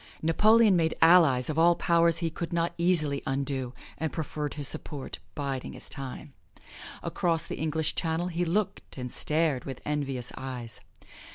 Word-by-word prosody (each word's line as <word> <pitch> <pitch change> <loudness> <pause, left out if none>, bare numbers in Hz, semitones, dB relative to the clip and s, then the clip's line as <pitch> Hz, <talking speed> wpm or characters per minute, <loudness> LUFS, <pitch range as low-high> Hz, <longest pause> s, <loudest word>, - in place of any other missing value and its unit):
Napoleon 215 +5 +5
made 165 -2 +1
allies 160 -7 +5
of 155 +1 -1
all 170 +1 +5
powers 170 -1 +3
he 165 -1 0
could 170 +2 -5
not 170 0 0
easily 160 -5 +2
undo, 135 -2 -2 0.2
and 160 -1 -2
proffered 150 -2 -4
his 145 -2 0
support 150 -3 -7 0.2
biding 135 -3 -4
his - - -7
time. 135 +1 -5 0.7
Across 165 -2 +1
the - - -5
English 160 0 0
Channel 165 +1 -1
he 175 0 -1
looked 180 0 -2
and 125 -1 -5
stared 155 -4 0
with 135 -3 -6
envious 135 -4 -2
eyes. 125 -4 -7
155 Hz, 155 wpm, -28 LUFS, 135-170 Hz, 0.7 s, Napoleon